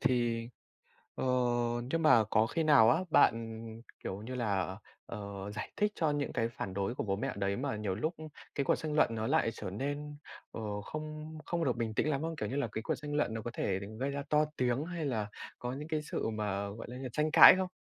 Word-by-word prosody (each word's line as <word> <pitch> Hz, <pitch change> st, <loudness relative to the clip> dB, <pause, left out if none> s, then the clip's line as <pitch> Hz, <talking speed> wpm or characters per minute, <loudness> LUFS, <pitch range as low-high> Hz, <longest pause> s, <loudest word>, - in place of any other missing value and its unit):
thì 120 Hz, -2 st, +1 dB, 0.7 s
ờ, -, -, -2 dB, 0.6 s
nhưng 165 Hz, +2 st, 0 dB
mà 125 Hz, -7 st, +7 dB
có 110 Hz, +1 st, +3 dB
khi 165 Hz, +8 st, -1 dB
nào 140 Hz, -7 st, +7 dB
á, 140 Hz, -, +5 dB
bạn, 115 Hz, -5 st, +3 dB, 0.4 s
kiểu 95 Hz, +2 st, -4 dB
như 130 Hz, +3 st, -6 dB
là, 100 Hz, -5 st, -1 dB, 0.3 s
ờ, 100 Hz, -2 st, -6 dB
giải -, -, -5 dB
thích 210 Hz, 0 st, +2 dB
cho 155 Hz, -3 st, +1 dB
những 145 Hz, -1 st, -2 dB
cái 115 Hz, -1 st, 0 dB
phản 100 Hz, -4 st, -5 dB
đối 100 Hz, +5 st, -1 dB
của -, -, -2 dB
bố 95 Hz, -2 st, 0 dB
mẹ 100 Hz, -, -2 dB
đấy, 100 Hz, 0 st, 0 dB
mà 130 Hz, -3 st, -2 dB
nhiều 105 Hz, -3 st, -2 dB
lúc 155 Hz, -, -2 dB, 0.4 s
cái 140 Hz, -, +1 dB
cuộc -, -, +3 dB
tranh 155 Hz, -1 st, -4 dB
luận 115 Hz, -6 st, +3 dB
nó 110 Hz, 0 st, -2 dB
lại 135 Hz, -5 st, +2 dB
trở 105 Hz, -, -6 dB
nên, 145 Hz, +7 st, -4 dB, 0.3 s
ờ, 105 Hz, -2 st, -4 dB
không 155 Hz, +4 st, -6 dB
không 170 Hz, -1 st, -1 dB
được 125 Hz, -3 st, +1 dB
bình 115 Hz, -2 st, -2 dB
tĩnh 150 Hz, -, +1 dB
lắm 140 Hz, -2 st, 0 dB
không? 165 Hz, +1 st, -3 dB
Kiểu 150 Hz, -, -3 dB
như 135 Hz, -, -3 dB
là 145 Hz, -4 st, 0 dB
cái 110 Hz, -, -3 dB
cuộc -, -, -1 dB
tranh 150 Hz, -1 st, -6 dB
luận 150 Hz, -6 st, +1 dB
nó 115 Hz, -, -3 dB
có 120 Hz, -, -5 dB
thể 95 Hz, -4 st, -1 dB, 0.2 s
gây 135 Hz, +2 st, 0 dB
ra 140 Hz, 0 st, -3 dB
to 150 Hz, 0 st, +4 dB
tiếng 125 Hz, +3 st, +1 dB
hay 170 Hz, -3 st, -4 dB
là 110 Hz, -6 st, -1 dB, 0.3 s
có 125 Hz, +1 st, -3 dB
những 150 Hz, +3 st, -6 dB
cái 155 Hz, -1 st, -1 dB
sự 150 Hz, -, -3 dB
mà, 100 Hz, -2 st, -2 dB
gọi 110 Hz, +3 st, -8 dB
là, 125 Hz, -, -7 dB
như 130 Hz, -1 st, -5 dB
tranh 150 Hz, 0 st, +1 dB
cãi 170 Hz, +2 st, +11 dB
không? 190 Hz, 0 st, 0 dB
125 Hz, 235 wpm, -32 LUFS, 110-150 Hz, 0.7 s, cãi